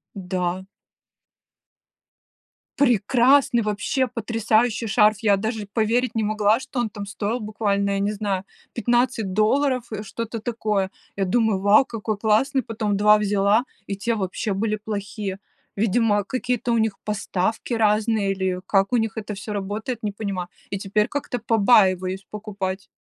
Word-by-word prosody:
Да. 180 -1 -2 2.1
Прекрасный, 245 +1 +4
вообще 215 +5 0
потрясающий 225 0 0
шарф! 210 +1 +4
Я 205 -3 +3
даже 220 0 -3
поверить 235 +3 +1
не 225 - +1
могла, 215 +2 +2
что 265 - -5
он 240 -2 0
там 205 -1 -7
стоил 205 +4 -3
буквально, 205 -2 -1
я 195 - 0
не 205 +1 0
знаю, 200 -2 -2 0.3
15 240 -3 +1
долларов, 255 +4 +2
э, 215 -1 -4
что-то 230 +2 -5
такое. 215 -4 -1 0.3
Я 195 - 0
думаю: 220 0 +2
"Вау, 205 +6 +5
какой 220 -3 -4
классный!" 235 +6 +2
Потом 210 -2 -2
2 210 +1 +5
взяла, 205 +2 +2 0.2
и 200 - -3
те 230 +4 -1
вообще 200 +1 -2
были 215 +2 -1
плохие. 205 -2 -5 0.4
Видимо, 205 0 +2
какие-то 245 +1 -2
у 235 - +3
них 220 -2 0
поставки 210 +2 -2
разные 215 -2 +2
или 190 -1 -1
как 195 0 +2
у 245 - +3
них 225 0 -1
это 210 -1 -4
всё 210 +1 -6
работает, 210 +4 -4
не 210 - -1
понимаю. 195 -4 -4 0.2
И 200 - -1
теперь 210 +2 +1
как-то 285 -3 -3
побаиваюсь 195 -4 +3
покупать. 200 -3 -5
210 Hz, 145 wpm, -23 LUFS, 200-230 Hz, 2.1 s, Вау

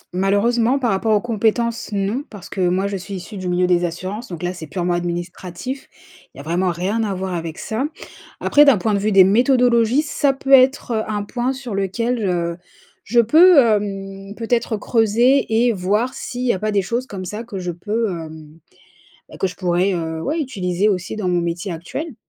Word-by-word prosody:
Malheureusement 225 +7 +2
par 250 -4 0
rapport 215 +3 +1
aux 205 - +2
compétences 230 0 -1
non 205 +6 -1
parce 200 -4 -11
que 190 - -4
moi 185 +2 +1
je 200 0 -2
suis 195 +2 -7
issue 185 +3 -8
du 185 -1 -4
milieu 180 +1 +2
des 180 -1 +2
assurances 185 +7 -4
donc 175 -4 -8
là 180 +1 -1
c'est 165 -3 -9
purement 175 +2 -1
administratif, 175 +8 -5 0.4
il - - -19
y - - -9
a - - -8
vraiment 175 +4 0
rien 185 +6 -1
à 200 -3 -2
voir 190 0 -4
avec 165 -2 -4
ça. 225 +5 -2 0.5
Après 295 - +5
d'un 280 -6 +6
point 210 +4 0
de 200 - +1
vue 210 +2 0
des 195 -2 +7
méthodologies, 245 +4 +3
ça 285 -2 +1
peut 270 0 -5
être, 265 -1 +5
heu, 220 -2 +1
un 210 -1 -2
point 245 +4 -2
sur 260 -4 -6
lequel 230 +5 -1
je 170 -3 -1 0.5
je 235 +3 +2
peux, 325 +9 +6
hem, 200 -3 -1
peut-être 230 0 -1
creuser 235 +5 +2 0.2
et 240 - +3
voir 210 +6 0
s'il 250 -2 -5
y 240 - +3
a 190 - -4
pas 215 +2 -1
des 200 -2 +1
choses 235 +7 -2
comme 190 -4 -6
ça 210 +5 -5
que 230 -4 -8
je 180 -1 -3
peux, 210 +5 -2
hem, 160 -2 -9 0.7
bah - - -12
que 190 - 0
je 180 - -9
pourrais, 180 +1 +1
heu, 160 -2 -3
ouais 310 - -2
utiliser 195 - -1
aussi 185 -1 -2
dans 205 -4 -2
mon 175 -1 +2
métier 170 +2 -3
actuel. 225 - -6
200 Hz, 205 wpm, -20 LUFS, 180-235 Hz, 0.7 s, des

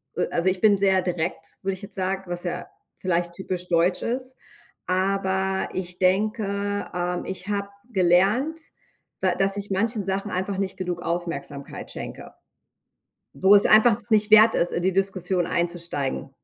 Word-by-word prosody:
äh, - - 0
also 170 +2 +1
ich 185 -1 -2
bin 205 -2 +5
sehr 190 -1 +3
direkt, 165 -2 -4
würde 195 0 -1
ich 190 - -7
jetzt 200 - -4
sagen, 190 0 -2
was 175 0 0
ja 175 - -4 0.3
vielleicht 175 -1 -1
typisch 180 -1 -4
deutsch 175 +2 +1
ist. 255 +2 -2 0.5
Aber 190 0 0
ich 180 -1 -4
denke, 200 +1 0
ähm, 180 0 -3
ich 190 0 -6
habe 200 -1 -2 0.2
gelernt, 200 - +2 0.6
da 185 -1 +2
dass 195 +1 +3
ich 200 0 -4
manchen 215 +2 0
Sachen 195 +2 -1
einfach 190 +1 -2
nicht 190 -1 -3
genug 180 -2 -4
Aufmerksamkeit 170 -5 -4
schenke - - -8 1.0
wo 190 +2 +5
es 205 0 +6
einfach 220 0 +5
es 235 - -1
nicht 215 0 +4
wert 215 +1 +7
ist, 175 - +4
in 175 - -2
die 190 0 0
Diskussion 190 -2 +3
einzusteigen. 170 -7 -2
190 Hz, 160 wpm, -24 LUFS, 175-200 Hz, 1.0 s, wert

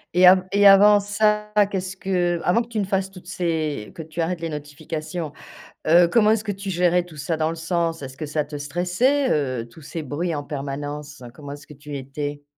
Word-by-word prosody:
Et 180 +1 +6
a 185 0 +7
et 200 0 +3
avant 205 +1 +8
ça, 210 +1 +1 0.2
qu'est-ce 185 -1 -3
que 175 -3 0
avant 205 +7 +3
que - - -15
tu 225 -2 -3
ne - - +1
fasses 190 0 -1
toutes 180 -2 -14
ces 160 - -2
que - - -7
tu 160 +2 -5
arrêtes 170 +1 -2
les 165 - -3
notifications, 155 +2 -6 0.5
heu, 170 +2 +6
comment 215 +3 +4
est-ce 220 -1 +2
que 210 - -2
tu 195 0 -6
gérais 180 -1 +2
tout 170 -3 -14
ça? 160 +3 -2
Dans 155 0 +1
le 165 - -4
sens, 165 -1 -2
est-ce 130 0 -8
que 155 - -5
ça 150 0 -1
te 150 0 -7
stressait, 180 - +1
heu, 130 -6 -1
tous 120 +7 -16
ces 155 +2 -6
bruits 160 +4 -2
en 145 - -4
permanence? 145 0 -6
Comment 145 0 -9
est-ce 145 0 -11
que 150 - -13
tu 145 0 -9
étais? 145 +2 -5
165 Hz, 220 wpm, -23 LUFS, 150-190 Hz, 0.5 s, avant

